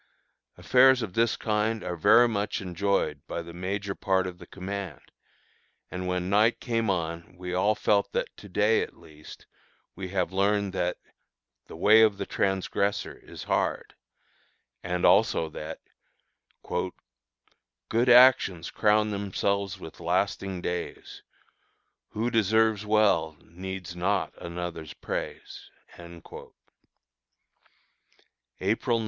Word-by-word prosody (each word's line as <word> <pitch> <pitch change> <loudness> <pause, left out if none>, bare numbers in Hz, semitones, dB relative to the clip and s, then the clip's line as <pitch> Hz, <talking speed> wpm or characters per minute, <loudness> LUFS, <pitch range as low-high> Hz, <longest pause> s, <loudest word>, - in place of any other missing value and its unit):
Affairs 130 -1 +5
of 95 -5 -6
this 115 +2 +1
kind 110 0 -1
are 90 +8 +4
much 105 -3 -2
enjoyed 100 +1 -1
by 85 - -4
the 85 0 -11
major 100 +3 -3
part 95 -1 0
of 90 -1 -7
the 85 - -12
command; 95 -5 -7 0.8
and 90 0 -4
when 90 0 -1
night 105 +4 +3
came 115 -3 -1
on 85 -1 -3
we 90 0 -5
all 100 +4 +2
felt 100 -1 +1
that - - -3
to 100 - -12
day, 105 +4 +2
at - - -6
least, 75 -2 -14 0.5
we 95 0 -5
have 90 -2 -1
learned 100 0 +1
that 90 -2 -1 0.7
"the - - -10
way 105 +6 +6
of 105 -3 +4
the 100 - -3
transgressor 100 +1 -1
is - - -11
hard," - - -1 0.9
and 90 0 -1
also 80 - +4
that 80 +1 -7 0.9
"Good 60 - -5
actions 120 -9 +5
crown 105 0 +2
themselves 100 -1 -1
with 80 - -11
lasting 95 +1 -1
days; 90 0 -5 0.9
Who 115 +3 -2
deserves 110 -1 +2
well 95 -8 +2
needs 90 0 -7
not 95 +3 0
another's 85 -2 -6
praise." - - -6 0.3
_April 85 -1 -11 2.1
9. 95 +2 +1
95 Hz, 120 wpm, -27 LUFS, 90-105 Hz, 2.1 s, way